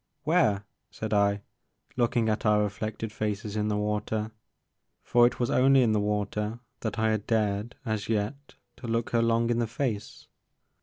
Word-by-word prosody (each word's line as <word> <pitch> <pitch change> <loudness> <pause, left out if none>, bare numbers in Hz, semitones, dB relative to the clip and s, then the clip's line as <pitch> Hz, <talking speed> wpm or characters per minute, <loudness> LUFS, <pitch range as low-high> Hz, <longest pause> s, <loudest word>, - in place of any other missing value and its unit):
" - - -50
Where,'* 155 - +3 0.3
said 110 -1 -4
I, 100 0 +2 0.5
looking 120 -2 +1
at 110 0 0
our 105 -1 +4
reflected 110 +2 -4
faces 105 -1 -3
in 105 0 0
the 105 -1 0
water. 105 +1 -1 0.7
For 120 0 +5
it 125 - -4
was 120 - 0
only 135 0 +5
in 115 - +3
the 105 - +2
water 105 +2 -1 0.2
that 110 - -3
I 110 0 +2
had 110 -2 -2
dared, 105 0 0
as 110 -2 -2
yet, 115 +7 -2 0.2
to - - -8
look 115 0 -1
her 115 - +3
long 115 0 +2
in 120 - +1
the 120 - +1
face. 115 -3 -3
110 Hz, 175 wpm, -28 LUFS, 105-120 Hz, 0.7 s, For